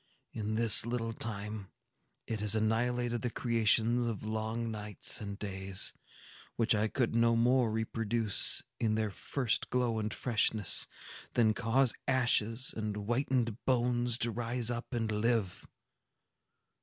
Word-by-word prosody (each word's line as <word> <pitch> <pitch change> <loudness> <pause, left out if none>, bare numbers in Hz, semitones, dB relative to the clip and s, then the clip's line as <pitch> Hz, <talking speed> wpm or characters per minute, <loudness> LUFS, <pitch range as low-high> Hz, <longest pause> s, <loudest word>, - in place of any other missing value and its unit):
In 110 0 -3
this 115 -2 +7
little 115 -1 -3
time, 105 -2 -5 0.6
it 110 - -4
has 105 +1 +3
annihilated 120 +2 0
the 125 - -1
creations 115 +1 +1
of 115 -3 -4
long 110 +1 -3
nights 105 +1 -1
and 100 -1 -6
days, 95 -2 -2 0.6
which 115 +1 +2
I 110 0 +1
could 120 +1 -1
no 115 0 +3
more 120 0 +3
reproduce, 110 -1 +1 0.2
in 110 -2 +1
their 110 -1 -1
first 125 +3 -2
glow 120 -3 0
and 105 0 -3
freshness, 110 -5 +1 0.5
than 110 -2 +3
cause 125 +2 +2
ashes 120 -1 +1
and 105 -2 -3
whitened 120 +1 -1
bones 120 -2 +1
to 120 - -2
rise 120 +1 0
up 120 +3 -5
and 115 -3 -2
live. 105 -2 -1
115 Hz, 130 wpm, -32 LUFS, 110-120 Hz, 0.6 s, this